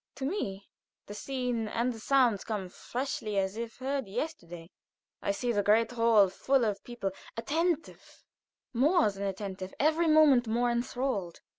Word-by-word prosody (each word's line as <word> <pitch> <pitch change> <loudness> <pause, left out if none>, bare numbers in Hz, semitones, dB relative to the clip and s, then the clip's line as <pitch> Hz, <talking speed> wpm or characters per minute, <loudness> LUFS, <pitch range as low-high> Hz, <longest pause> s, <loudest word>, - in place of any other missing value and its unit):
To 265 - -4
me 205 - -3 0.4
the 205 - -8
scene 245 -1 -2
and 240 +3 -1
the 225 - -10
sounds 245 -4 +3
come 205 -4 -4
freshly 235 -1 -4
as 190 +1 0
if 230 0 -6
heard 270 -2 -2
yesterday. 175 - -6 0.5
I - - -3
see 240 +5 0
the 205 -3 +1
great 220 +3 +3
hall 230 -4 +5
full 260 +6 +1
of 205 -2 -2
people, 240 -5 -4 0.3
attentive 325 +7 -2 0.5
more 290 - +3
than 195 0 -10
attentive 190 -1 -5
every 320 +3 +3
moment 300 -6 +5
more 240 +2 +1
inthralled. 235 -6 -2
235 Hz, 150 wpm, -30 LUFS, 200-270 Hz, 0.5 s, hall